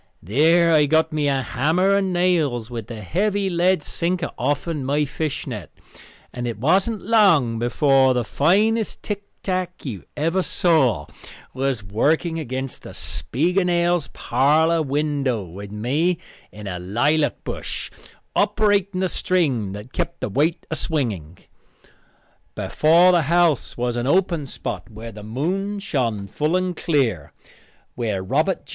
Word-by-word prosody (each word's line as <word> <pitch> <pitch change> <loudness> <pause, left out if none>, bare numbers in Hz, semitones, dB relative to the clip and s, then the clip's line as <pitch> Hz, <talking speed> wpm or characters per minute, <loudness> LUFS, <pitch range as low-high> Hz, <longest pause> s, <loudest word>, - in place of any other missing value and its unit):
There 165 - +4
I 150 -2 +4
got 160 +1 +2
me 150 -1 0
a 135 -2 +1
hammer 165 +11 +1
and 195 -1 +1
nails 160 -10 +1
with 115 -3 -5
the 110 -3 -7
heavy 200 - 0
lead 175 -1 +2
sinker 175 +1 -1
offen 145 +3 -2
my 145 +3 +1
fishnet, 135 - -4 0.6
and 120 -1 -4
it 115 -3 -4
wasn't 190 - +1
long 170 - +4
before 130 +2 +3
the 125 - +1
finest 210 - +1
tick 205 -1 -4 0.2
tack 185 -3 -3
you 110 -9 -6
ever 165 +5 +1
saw 135 - +2 0.5
was 130 -4 -1
working 155 - 0
against 130 -2 -4
the - - -10
Spiegelnails' 175 +2 0
parlor 160 +4 +2
window, 140 -5 -1
with 100 +3 -9
me 145 +12 0 0.3
in 105 0 -10
a 90 -2 -4
lilac 145 - 0
bush - - -5 0.4
operating 200 -3 +2
the 190 - +2
string 140 - 0
that 105 +5 -9
kept 170 -1 -3
the - - -3
weight 150 - 0
a - - 0
swinging. 105 - -2 1.2
Before 170 +4 +4
the 175 -2 +4
house 170 -5 +2
was 120 0 -1
an 120 +1 -1
open 170 -3 +1
spot - - -5
where 115 +1 -9
the 105 0 -10
moon 180 - -2
shone 120 - -2
full 150 - -1
and 185 -1 0
clear, 125 - 0 0.6
where 105 -6 -2
Robert 95 - 0
J. - - -20
150 Hz, 140 wpm, -22 LUFS, 120-175 Hz, 1.2 s, There